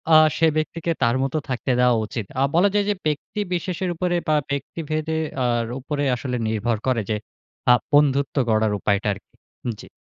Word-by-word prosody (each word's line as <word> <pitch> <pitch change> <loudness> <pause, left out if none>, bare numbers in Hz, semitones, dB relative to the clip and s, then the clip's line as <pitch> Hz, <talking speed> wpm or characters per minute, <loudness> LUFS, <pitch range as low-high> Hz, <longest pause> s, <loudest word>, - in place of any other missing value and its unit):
আ - - +11 0.2
সে 165 - +4
ব্যক্তিকে 165 +2 -1
তার 120 +1 +3
মত 135 - -2 0.2
থাকতে 125 +1 -1
দেওয়া 125 -1 +5
উচিত। 115 -3 -5 0.2
আ - - +5
বলা 195 +4 +5
যায় 205 -1 +2
যে 205 - +2
ব্যক্তিবিশেষের 180 +3 -2
উপরে 175 +1 0
বা 155 - +3 0.2
ব্যক্তিভেদে 155 +2 -2 0.3
আর 120 -1 +1
উপরে 145 +2 -3
আসলে 125 -1 -3
নির্ভর 110 +1 0
করে 120 -3 +2
যে 110 - +1 0.6
আ - - +9 0.2
বন্ধুত্ব 140 -1 +3
গড়ার 110 -1 +3
উপায়টা 100 +1 0
আরকি। 100 - -15 0.5
জি। - - -12
140 Hz, 170 wpm, -23 LUFS, 120-165 Hz, 0.6 s, আ